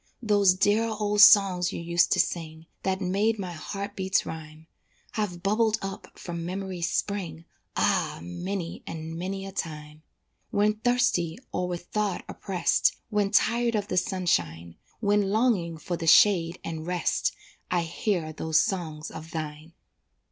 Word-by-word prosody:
Those 205 -4 +4
dear 205 +4 +3
old 210 -1 +1
songs 195 -4 +7
you - - -5
used 170 +1 +2
to - - 0
sing, 160 -1 -2 0.2
That 190 0 -1
made 200 +4 +1
my 185 -3 -4
heart 200 +5 -6
beats 190 0 +1
rhyme, 155 0 -8 0.5
Have 185 -5 -3
bubbled 215 +2 +2
up 195 0 -7
from 170 -1 -5
memory's 185 -1 -3
spring, 170 -6 -3 0.3
Ah! - - +1
many 170 - -5
and 160 0 -6
many 190 +3 -4
a 195 - -7
time. 155 -4 -6 0.5
When 210 +1 +1
thirsty 245 -9 +1
or 180 0 -1
with 175 -1 -5
thought 210 -3 -1
oppressed, 185 -3 +1 0.2
When 205 -1 +1
tired 235 +2 +2
of 205 -1 -2
the 185 - -1
sunshine, 85 - 0 0.3
When 205 -2 +2
longing 205 -7 +1
for 170 +3 -4
the 165 - -5
shade 170 -1 +5
and 160 0 -5
rest, 180 -2 0 0.4
I 175 -1 +1
hear 165 -1 -2
those 160 0 +1
songs 160 -5 -2
of 160 - -9
thine. 155 0 -6
180 Hz, 150 wpm, -27 LUFS, 165-205 Hz, 0.5 s, songs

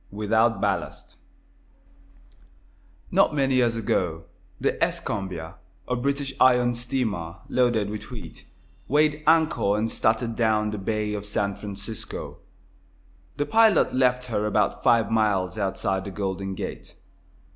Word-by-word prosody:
WITHOUT 110 +1 +1
BALLAST - - -3 2.0
Not - - +3
many 135 -2 +2
years 120 -2 +3
ago 90 -7 -1 0.4
the - - 0
"Escambia," 95 -3 -3 0.3
a 125 - 0
British 140 +2 -1
iron 125 -1 +5
steamer, 120 -9 -2
loaded 120 -5 +1
with 105 - -7
wheat, - - -10 0.4
weighed 150 +1 +2
anchor 155 -10 +3
and 110 +1 -1
started 115 +1 0
down 110 -2 +1
the 105 - -4
bay 105 +1 -2
of 105 -1 -4
San 100 -1 -1
Francisco. 105 +2 -7 1.0
The 145 - 0
pilot 220 -2 +4
left 125 -1 +2
her 105 -3 -1
about 105 0 0
five 115 -2 +3
miles 105 -3 +1
outside 95 -1 -1
the - - -4
Golden 95 0 -3
Gate. - - -7
110 Hz, 125 wpm, -25 LUFS, 100-125 Hz, 2.0 s, iron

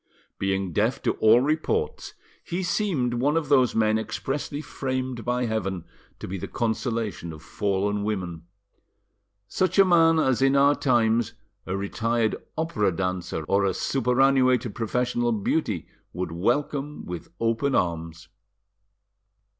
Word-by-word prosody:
Being 95 -2 -1
deaf - - +1
to - - +2
all 110 +3 +6
reports, 160 - -1 0.3
he 175 +2 -3
seemed 175 - 0
one 140 +6 +1
of 155 -4 -2
those 130 -4 +4
men 110 0 +3
expressly 135 +7 -4
framed 130 -4 -3
by 125 0 0
heaven 95 -6 -2 0.3
to - - -7
be 95 +1 -4
the - - -5
consolation 110 -6 -2
of 80 -1 -11
fallen 100 0 -1
women; 90 -6 -4 1.0
such 185 - 0
a 195 - +8
man 165 -2 +5
as 130 -5 +2
in 135 +1 +4
our 140 +1 +5
times 120 -5 +2 0.3
a 95 +1 -2
retired 115 +3 0 0.2
opera 160 - +1
dancer 90 -2 -3
or 100 +6 +1
a 95 -2 +1
superannuated 130 -2 +2
professional 120 +1 0
beauty 105 - -1 0.3
would 90 -1 -3
welcome 140 - -1
with 90 -1 -6
open 115 +4 +1
arms. 85 0 -2
115 Hz, 130 wpm, -25 LUFS, 95-135 Hz, 1.0 s, a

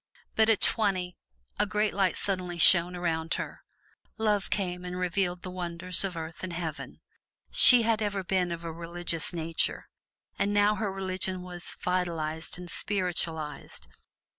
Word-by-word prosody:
But 220 0 +3
at 220 - +2
twenty, 185 -5 +1 0.4
a 210 - +2
great 210 +2 0
light 190 -3 +1
suddenly 180 -3 -1
shone 175 +1 +7
around 165 -2 -2
her. - - -6 0.6
Love 210 -2 0
came 180 -3 -3
and 180 0 -6
revealed 180 0 -2
the 185 - -6
wonders 180 0 +1
of 185 -3 -4
Earth 160 +2 -7
and 185 -2 -5
Heaven. 165 -3 -6 0.5
She 245 -2 +9
had 225 -1 +1
ever 200 -2 -2
been 180 -1 -1
of 170 0 -6
a 165 - -5
religious 170 0 -2
nature, 165 -1 -1 0.5
but - - +1
now 205 +1 +3
her 210 -2 -3
religion 185 -1 -4
was 175 -1 -5
vitalized 165 -3 -2
and 180 0 -9
spiritualized. 165 - -3
180 Hz, 150 wpm, -28 LUFS, 170-195 Hz, 0.6 s, She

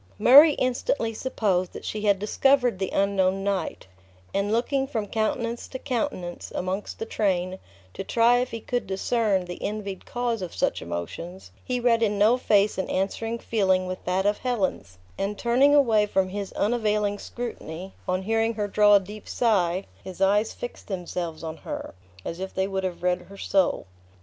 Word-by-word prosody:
Murray 290 - +8
instantly 245 -3 -1
supposed 200 -7 -1
that - - -8
she 215 - -3
had 205 -2 +3
discovered 245 +2 +2
the 190 - -1
unknown 195 -1 +1
knight; 200 -1 -2 0.5
and 200 +1 0
looking 265 +4 +1
from 225 -6 -2
countenance 230 +2 -2
to 260 - -6
countenance, 245 -10 -3
amongst 185 +3 -3
the 225 - -4
train, 185 -4 -1 0.3
to - - -5
try 235 +4 +4
if 250 - -1
he 230 - -5
could 245 -1 -2
discern 195 0 0
the 175 0 -8
envied 200 -3 -4
cause 240 -3 -2
of 180 -2 -6
such - - 0
emotions, 85 - -6
he 250 -1 -2
read 235 -1 +3
in 210 -2 +1
no 215 +4 +5
face 210 -5 +2
an 190 - -2
answering 225 +4 -1
feeling 190 -5 +1
with 185 0 -5
that 185 +2 0
of 205 0 +2
Helen's; 200 - -2 0.2
and 200 +1 -2
turning 260 +6 +4
away 225 -7 +4
from 190 -2 +1
his 200 0 -5
unavailing 210 -2 0
scrutiny, 190 -6 -7
on 185 +1 0
hearing 225 +2 +1
her 210 -1 -1
draw 205 0 +5
a - - +7
deep 205 +2 -10
sigh, 190 -6 +1 0.2
his 185 -1 -9
eyes 205 +3 +3
fixed 245 - -8
themselves 175 -4 -4
on 160 0 -5
her, - - -6 0.3
as 170 - -5
if 190 0 -6
they 190 0 +1
would 190 -1 -2
have 180 -2 -4
read 180 0 +1
her 200 - -11
soul. 190 - +1
205 Hz, 175 wpm, -25 LUFS, 190-230 Hz, 0.5 s, Murray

